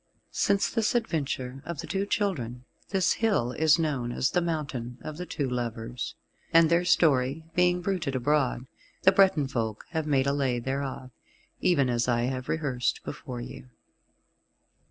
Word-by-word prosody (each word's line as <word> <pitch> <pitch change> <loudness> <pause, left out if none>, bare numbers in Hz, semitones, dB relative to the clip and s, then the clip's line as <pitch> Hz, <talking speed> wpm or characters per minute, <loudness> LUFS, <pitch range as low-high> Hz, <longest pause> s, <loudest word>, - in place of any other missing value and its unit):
Since 200 0 +1
this 225 0 +1
adventure 135 - -2
of 170 -3 -6
the - - -7
Two 195 0 -2
Children 125 - -2 0.2
this 190 -3 +2
hill 200 - +1
is 155 +5 +4
known 140 -7 -1
as 130 +2 0
the 175 - +2
Mountain 140 -8 -3
of 155 -1 -6
the 180 +1 -5
Two 140 -4 -2
Lovers, 120 -1 -4 0.4
and 165 0 +6
their 170 +1 +4
story 145 -3 +3
being 180 0 +3
bruited 175 -7 -1
abroad, 130 -1 +1 0.4
the - - +7
Breton 185 -8 +4
folk 115 -5 -3
have 160 -2 -2
made 135 -3 +2
a 140 - +2
Lay 135 -3 +1
thereof, 130 +1 -4 0.5
even 140 -7 +3
as 120 -1 0
I 120 -1 +2
have 130 0 -3
rehearsed 140 -6 -1
before 125 -2 -6
you. 130 +1 -9
140 Hz, 155 wpm, -28 LUFS, 125-170 Hz, 0.5 s, the